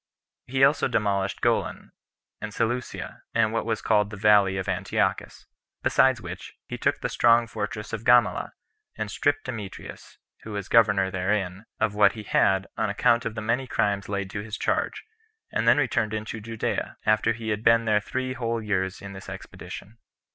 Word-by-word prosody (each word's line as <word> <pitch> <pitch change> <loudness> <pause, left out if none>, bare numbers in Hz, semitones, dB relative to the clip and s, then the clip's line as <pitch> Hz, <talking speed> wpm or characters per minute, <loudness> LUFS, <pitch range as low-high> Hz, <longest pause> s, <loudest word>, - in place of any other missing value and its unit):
He 135 +1 +1
also 140 +2 +4
demolished 100 -4 0
Golan, - - 0 0.5
and - - -5
Seleucia, 120 +2 -3
and 110 -1 +2
what 115 0 -1
was 110 -2 -1
called 105 -1 +3
the 105 - -8
Valley 100 -2 +4
of 95 - -3
Antiochus; - - -1 0.4
besides 130 -2 +4
which, 90 -3 -8
he - - -6
took - - 0
the - - 0
strong 120 0 +4
fortress 105 -2 -5
of 115 -1 -4
Gamala, 120 -4 +3 0.4
and 110 -2 -3
stripped 145 +8 0
Demetrius, 110 -7 -8 0.2
who 110 - -8
was 100 -2 -5
governor 100 -4 +4
therein, 95 +1 -1
of 110 -2 +1
what 105 0 +5
he 110 - -8
had, 95 -1 +2
on 110 -1 0
account 115 +4 +2
of 110 - -3
the 110 - -4
many 120 +4 -1
crimes 100 -4 0
laid 100 -1 -3
to 100 - -4
his 110 0 -6
charge, - - -1 0.5
and - - -1
then - - +6
returned 110 0 +1
into 110 +1 -5
Judea, 115 +1 -3
after 110 +1 +3
he 115 -1 -6
had 105 0 -2
been 115 -2 +4
three 130 +4 -3
whole 115 -2 -2
years 95 -4 -2
in 100 0 -7
this 95 -1 -10
expedition. 110 +4 -9
110 Hz, 175 wpm, -26 LUFS, 100-115 Hz, 0.5 s, then